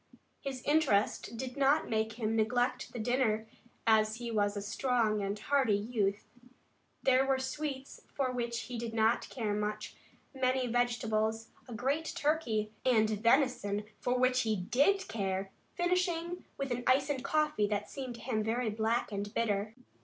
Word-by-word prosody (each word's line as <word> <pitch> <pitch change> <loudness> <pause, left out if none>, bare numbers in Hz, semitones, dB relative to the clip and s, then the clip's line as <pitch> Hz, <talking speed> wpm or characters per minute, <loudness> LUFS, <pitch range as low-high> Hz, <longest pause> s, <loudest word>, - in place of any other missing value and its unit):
His 265 -2 -5
interest 235 -7 +2
did 255 +1 -5
not 280 +2 +3
make 220 0 0
him 225 -1 -1
neglect 245 +3 +1
the - - -7
dinner, 225 -2 +1 0.4
as 215 -1 +4
he 235 0 -5
was 205 -2 +1
a - - -2
strong 220 -1 +1
and 200 +1 -2
hearty 260 -1 +2
youth. 205 -2 -1 0.8
There 265 0 +5
were 270 0 +2
sweets 270 0 -4
for 265 -3 -1
which 235 -1 -2
he 245 -2 -6
did 230 -1 -4
not 225 +2 +2
care 220 -5 -2
much, 210 +1 -3 0.4
many 260 -1 +1
vegetables, 225 -2 0 0.2
a 245 - -8
great 285 +8 -1
turkey, 285 -10 0
and 220 -4 +3
venison 225 -2 +2 0.2
for 250 0 0
which 255 0 +3
he 220 -2 +1
did 280 - +2
care, 195 -2 -2 0.2
finishing 350 -1 0
with 275 -2 -3
an 245 0 -2
ice 270 +3 +4
and 265 -2 -3
coffee 300 -7 +1
that 210 0 -2
seemed 260 -3 -6
to - - -11
him 230 -3 -1
very 225 +1 0
black 220 +2 0
and 205 0 -3
bitter. 215 -1 0
235 Hz, 160 wpm, -32 LUFS, 215-265 Hz, 0.8 s, There